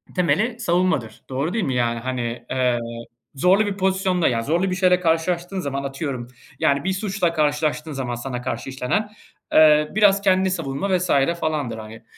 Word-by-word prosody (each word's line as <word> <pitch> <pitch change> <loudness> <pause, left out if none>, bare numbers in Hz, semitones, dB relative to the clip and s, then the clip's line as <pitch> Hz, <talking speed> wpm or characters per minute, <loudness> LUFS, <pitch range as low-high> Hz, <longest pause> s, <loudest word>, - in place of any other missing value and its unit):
temeli 200 - +1
savunmadır. 175 - 0
Doğru 140 +6 -2
değil 225 -3 0
mi? 130 - -1
Yani, 120 -1 0
hani, 120 -1 -4
eee, 125 -2 +1 0.6
zorlu 185 +9 +4
bir 200 -1 -3
pozisyonda, 190 -2 +1
yani 115 -2 0
zorlu 175 +5 +1
bir - - 0
şeyle 180 -1 +3
karşılaştığın 175 +2 0
zaman, 140 -4 -3
atıyorum, 135 -3 -4 0.3
yani 140 +1 +2
bir 190 0 0
suçla 190 -3 -1
karşılaştığın 150 0 0
zaman 130 -4 -3
sana 125 0 -5
karşı 125 +1 -4
işlenen, 135 +12 -1 0.4
eee, 150 -1 +6
biraz 200 -2 +5
kendini 190 -1 +3
savunma 165 +2 -1
vs. 180 0 -3 0.3
falandır 150 -8 -2
hani. 110 +1 -10
155 Hz, 165 wpm, -22 LUFS, 130-185 Hz, 0.6 s, eee